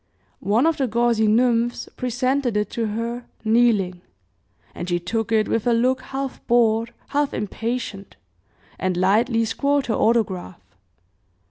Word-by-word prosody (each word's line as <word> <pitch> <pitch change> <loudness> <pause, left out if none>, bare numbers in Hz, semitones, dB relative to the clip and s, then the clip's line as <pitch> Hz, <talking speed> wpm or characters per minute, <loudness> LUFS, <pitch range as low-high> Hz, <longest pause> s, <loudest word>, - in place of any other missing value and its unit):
One 225 +7 +3
of 325 -1 +2
the 270 - 0
gauzy 235 -1 +2
nymphs 240 +1 +2
presented 255 -1 0
it 210 - -1
to 230 -2 -2
her, 230 +3 -4 0.2
kneeling, 220 -6 +2 0.7
and 175 - -6
she 175 - +1
took 225 +6 -3
it 215 -1 +3
with 230 +1 -1
a 240 - +4
look 255 +3 +2
half 270 0 -5
bored, 230 -1 +3 0.2
half 290 0 0
impatient, 210 -1 -4 0.6
and 185 -1 -1
lightly 225 +5 +2
scrawled 280 +5 0
her 230 - -1
autograph. 205 -7 0
230 Hz, 135 wpm, -22 LUFS, 210-245 Hz, 0.7 s, a